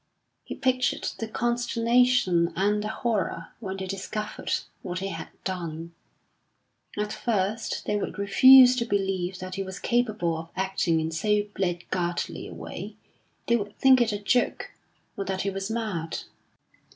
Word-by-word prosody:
He -, -, -7 dB
pictured 255 Hz, -1 st, 0 dB
the 225 Hz, -, -3 dB
consternation 240 Hz, -5 st, +2 dB
and 205 Hz, +3 st, +1 dB
the -, -, -2 dB
horror 215 Hz, -7 st, -2 dB
when 195 Hz, -4 st, -5 dB
they 190 Hz, -, -4 dB
discovered 195 Hz, +3 st, -5 dB, 0.3 s
what 180 Hz, -1 st, -4 dB
he 195 Hz, +1 st, -3 dB
had -, -, -6 dB, 0.2 s
done. 170 Hz, -3 st, -4 dB, 1.0 s
At 210 Hz, 0 st, -2 dB
first 220 Hz, -1 st, -1 dB
they 210 Hz, -, 0 dB
would 205 Hz, -, -4 dB
refuse 250 Hz, +6 st, +8 dB
to 235 Hz, -, 0 dB
believe 190 Hz, -3 st, -1 dB
that 185 Hz, 0 st, -7 dB
he 195 Hz, -, -3 dB
was 190 Hz, 0 st, -6 dB
capable 215 Hz, -10 st, 0 dB
of 165 Hz, 0 st, -9 dB
acting 190 Hz, -3 st, +1 dB
in 160 Hz, 0 st, -2 dB
so 210 Hz, +6 st, +1 dB
blackguardly 175 Hz, -1 st, -2 dB
a -, -, -9 dB
way; -, -, -7 dB, 0.5 s
they 235 Hz, -, +3 dB
would 205 Hz, -2 st, -3 dB
think 260 Hz, -2 st, +6 dB
it 235 Hz, -2 st, +2 dB
a 205 Hz, -, -1 dB
joke, 210 Hz, +4 st, 0 dB, 0.4 s
or 195 Hz, -, -3 dB
that 190 Hz, -1 st, -2 dB
he 200 Hz, -, -1 dB
was 195 Hz, +1 st, -4 dB
mad. 210 Hz, -8 st, -3 dB
200 Hz, 150 wpm, -26 LUFS, 185-230 Hz, 1.0 s, refuse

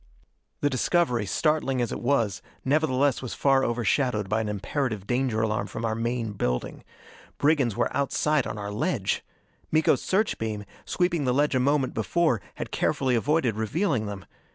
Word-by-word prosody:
The 145 Hz, -, +3 dB
discovery, 130 Hz, -, +1 dB
startling 150 Hz, -, +1 dB
as 120 Hz, -, 0 dB
it -, -, -4 dB
was, 115 Hz, -6 st, +1 dB, 0.2 s
nevertheless 140 Hz, -2 st, +2 dB
was 130 Hz, -, -5 dB
far 135 Hz, -1 st, +3 dB
overshadowed 120 Hz, -2 st, +1 dB
by 105 Hz, +3 st, +1 dB
an 110 Hz, -, -3 dB
imperative 105 Hz, +1 st, -2 dB
danger 120 Hz, -2 st, 0 dB
alarm 110 Hz, -1 st, -1 dB
from 115 Hz, -, -4 dB
our 110 Hz, -, 0 dB
main 115 Hz, 0 st, -2 dB
building. 60 Hz, -11 st, -2 dB, 0.5 s
Brigands 140 Hz, -7 st, +2 dB
were 120 Hz, -, 0 dB
outside 140 Hz, 0 st, +1 dB
on -, -, -5 dB
our 100 Hz, 0 st, -4 dB
ledge! 115 Hz, -, -1 dB, 0.5 s
Miko's 155 Hz, -4 st, +3 dB
search 210 Hz, +3 st, 0 dB
beam, 105 Hz, -2 st, -3 dB, 0.2 s
sweeping 175 Hz, -5 st, 0 dB
the 125 Hz, -, +2 dB
ledge 145 Hz, +1 st, +2 dB
a 130 Hz, -, +2 dB
moment 135 Hz, 0 st, +1 dB
before, 130 Hz, -, +1 dB
had -, -, -6 dB
carefully 130 Hz, -2 st, +1 dB
avoided 130 Hz, -1 st, +1 dB
revealing 110 Hz, -, 0 dB
them. 100 Hz, -2 st, -7 dB
125 Hz, 160 wpm, -26 LUFS, 110-145 Hz, 0.5 s, The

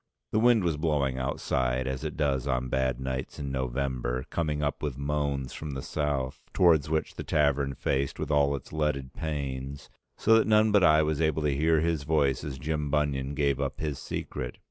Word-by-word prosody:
The 110 Hz, -, +2 dB
wind 120 Hz, -2 st, +5 dB
was 85 Hz, -4 st, 0 dB
blowing 70 Hz, -4 st, 0 dB
outside 65 Hz, -1 st, -1 dB
as 65 Hz, +2 st, -3 dB
it 75 Hz, 0 st, -4 dB
does 70 Hz, -4 st, 0 dB
on 65 Hz, 0 st, 0 dB
bad 65 Hz, -1 st, 0 dB
nights 65 Hz, 0 st, -4 dB
in 70 Hz, -2 st, -4 dB
November, 65 Hz, -1 st, -2 dB
coming 75 Hz, -3 st, -1 dB
up 70 Hz, -, -1 dB
with 70 Hz, -4 st, -3 dB
moans 70 Hz, -2 st, -2 dB
from 75 Hz, -3 st, -6 dB
the 65 Hz, -, -4 dB
South, 70 Hz, -4 st, -2 dB
towards 80 Hz, -5 st, +4 dB
which 80 Hz, 0 st, -1 dB
the -, -, -6 dB
tavern 70 Hz, -3 st, +1 dB
faced 70 Hz, +2 st, -1 dB
with -, -, -3 dB
all 70 Hz, -1 st, +3 dB
its 70 Hz, -, -9 dB
leaded 75 Hz, -4 st, -1 dB
panes, 70 Hz, -3 st, -4 dB, 0.3 s
so 115 Hz, -, +4 dB
that 110 Hz, -, +1 dB
none 110 Hz, 0 st, +5 dB
but 105 Hz, -2 st, +5 dB
I 80 Hz, -2 st, +6 dB
was 75 Hz, 0 st, 0 dB
able 80 Hz, -1 st, +1 dB
to 75 Hz, -2 st, +1 dB
hear 80 Hz, +2 st, +3 dB
his 80 Hz, -2 st, 0 dB
voice 70 Hz, -3 st, +1 dB
as 70 Hz, -3 st, -5 dB
Jim 75 Hz, +1 st, -2 dB
Bunion 70 Hz, -1 st, 0 dB
gave 70 Hz, -1 st, +1 dB
up 70 Hz, -, -3 dB
his 75 Hz, -3 st, -3 dB
secret. 65 Hz, -1 st, -5 dB
70 Hz, 195 wpm, -28 LUFS, 65-75 Hz, 0.3 s, I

